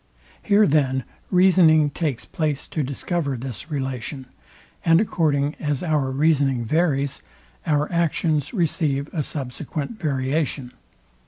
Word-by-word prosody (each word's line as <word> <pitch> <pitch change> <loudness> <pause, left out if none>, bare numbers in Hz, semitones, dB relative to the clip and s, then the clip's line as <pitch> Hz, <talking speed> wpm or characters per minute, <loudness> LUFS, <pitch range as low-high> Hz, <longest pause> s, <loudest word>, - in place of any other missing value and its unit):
Here 210 +1 +4
then 135 -4 +2 0.3
reasoning 175 -5 +5
takes 145 -5 -2
place 150 -4 -2
to 155 - -3
discover 140 +1 -2
this 125 - -6
relation; 135 -2 -4 0.6
and 165 0 +5
according 150 -8 +1
as 145 -1 -2
our 150 -5 +1
reasoning 135 -3 +2
varies, 140 -1 +1 0.5
our 150 -1 +2
actions 160 -3 0
receive 155 - -1
a 160 - 0
subsequent 145 - -5
variation. 135 -2 -1
150 Hz, 110 wpm, -23 LUFS, 135-160 Hz, 0.6 s, reasoning